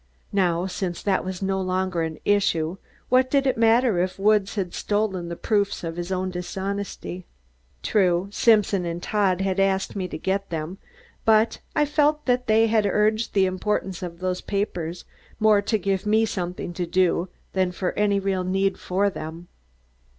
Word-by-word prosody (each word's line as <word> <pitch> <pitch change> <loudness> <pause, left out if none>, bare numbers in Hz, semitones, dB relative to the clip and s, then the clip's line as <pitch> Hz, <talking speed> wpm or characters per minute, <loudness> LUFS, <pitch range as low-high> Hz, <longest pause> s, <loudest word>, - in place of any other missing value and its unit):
Now, 180 -3 +2
since 185 -2 -4
that 195 -2 +1
was 185 +1 -5
no 190 0 0
longer 185 -1 -1
an 160 -1 -3
issue, 185 -4 +1 0.3
what 255 +1 +4
did 275 0 +2
it 260 - +2
matter 230 -2 +3
if 185 +1 -1
Woods 205 0 +2
had 190 -4 -2
stolen 205 -4 -1
the 170 - -4
proofs 200 0 0
of 165 -1 -4
his 175 +1 -5
own 185 0 -1
dishonesty. 190 0 -5 0.6
True, 185 -2 +2
Simpson 210 -4 +3
and 170 0 -4
Todd 195 -4 +1
had 195 0 0
asked 195 0 +1
me 190 -2 -2
to - - -6
get 195 +3 -2
them, 165 +4 -4 0.4
but 220 0 +3 0.2
I 295 - +3
felt 300 +1 +1
that 250 0 +1
they 220 +1 +5
had 220 -2 +2
urged 215 +3 +1
the 195 -1 +5
importance 185 0 -2
of 175 -2 -6
those 185 0 -2
papers 180 -4 -3 0.3
more 215 -2 +5
to 215 +2 0
give 195 0 -1
me 220 +1 +4
something 180 -3 -4
to 175 0 -3
do 180 0 +1 0.2
than 185 -1 +1
for 180 0 -2
any 205 -1 +1
real 190 -1 -1
need 195 +1 0
of 195 +2 +2
them. 165 +2 -7
190 Hz, 170 wpm, -24 LUFS, 180-210 Hz, 0.6 s, they